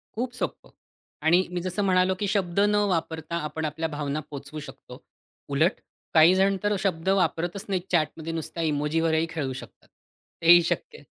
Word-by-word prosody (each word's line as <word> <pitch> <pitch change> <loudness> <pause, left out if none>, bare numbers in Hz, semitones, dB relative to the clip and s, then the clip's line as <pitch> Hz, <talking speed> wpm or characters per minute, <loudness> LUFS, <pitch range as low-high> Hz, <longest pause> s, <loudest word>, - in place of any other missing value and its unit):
खूप 245 +2 -2
सोप्पं - - -5 0.6
आणि 175 +3 +4
मी 175 -1 -2
जसं 185 +3 -2
म्हणालो, 185 -1 +3
की 205 - -1
शब्द 195 -3 0
न 205 +1 +3
वापरता 165 -1 -2
आपण 155 +1 -4
आपल्या 160 +2 -2
भावना 145 0 -3
पोहचवू 145 +1 -7
शकतो. - - -12 0.5
उलट, 155 +7 +2 0.3
काहीजण 185 +5 +5
तर 205 0 +2
शब्द 185 -2 -1
वापरतच 185 0 0
नाहीत 185 -2 0
चॅटमध्ये, 165 -1 0
नुसत्या 165 +1 -4
इमोजीवरही 160 +2 +1
खेळू 145 -5 -3
शकतात. 130 - -11 0.5
ते 165 0 +6
ही 175 0 +9
शक्य 460 - -3
आहे. - - -17
165 Hz, 160 wpm, -26 LUFS, 160-190 Hz, 0.6 s, ही